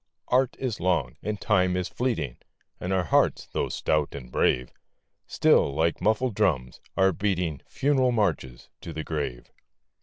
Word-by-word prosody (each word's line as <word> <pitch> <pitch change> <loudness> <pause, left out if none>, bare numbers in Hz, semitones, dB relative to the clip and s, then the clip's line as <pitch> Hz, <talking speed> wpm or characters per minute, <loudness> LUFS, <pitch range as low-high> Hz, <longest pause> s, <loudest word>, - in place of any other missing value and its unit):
Art 130 0 +2
is 125 -5 -3
long, 85 -9 0
and 105 0 -3
Time 90 -4 +2
is 90 - -1
fleeting, 95 - -2 0.4
And 90 - -3
our 95 -1 +2
hearts, 85 - +2
though - - -1
stout 75 -2 0
and 65 -3 -9
brave, 60 0 +1 0.6
Still, 70 - +3
like 85 +3 +1
muffled 110 +5 +1
drums, 75 - 0 0.2
are 95 0 +5
beating 90 -6 -1
Funeral 135 -3 +2
marches 85 - -1
to 85 - -7
the 80 +1 -4
grave. 70 -7 -4
90 Hz, 150 wpm, -26 LUFS, 75-105 Hz, 0.6 s, are